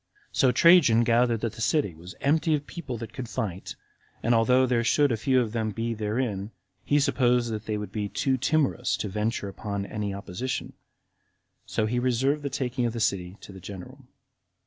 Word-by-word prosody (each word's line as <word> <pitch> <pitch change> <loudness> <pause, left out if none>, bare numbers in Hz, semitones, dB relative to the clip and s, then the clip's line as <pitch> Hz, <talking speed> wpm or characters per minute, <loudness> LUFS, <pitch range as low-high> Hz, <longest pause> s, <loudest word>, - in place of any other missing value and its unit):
So 130 -4 +3
Trajan 125 -5 +6
gathered 115 -1 +2
that 115 -2 -2
the 110 - -9
city 140 - +1
was 85 +4 -11
empty 155 +3 +2
of 145 -1 -4
people 140 -9 -6
that 115 0 -8
could 125 -3 -6
fight, 95 -4 -4 0.5
and 120 - +3
although 125 +3 +4
there 120 -2 +1
should 145 +3 +3
a - - +2
few 130 +4 +2
of 115 -4 -1
them 110 -1 -1
be 115 +2 -2
therein, 105 -2 -2 0.3
he 145 - +2
supposed 125 -4 +2
that 110 -1 -5
they 105 -1 -1
would 105 -2 -6
be 105 -1 -3
too 135 +5 0
timorous 135 -2 +1
to 105 - -3
venture 105 +1 -2
upon 100 0 -4
any 105 -1 -3
opposition; 100 +6 -4 0.9
so 110 - 0
he 120 +3 0
reserved 130 +4 +1
the 140 - -3
taking 125 -2 -1
of 115 - -3
the 115 - -4
city 95 -3 -1
to - - -11
the 95 - -11
general. 95 -1 -9
115 Hz, 190 wpm, -26 LUFS, 105-130 Hz, 0.9 s, Trajan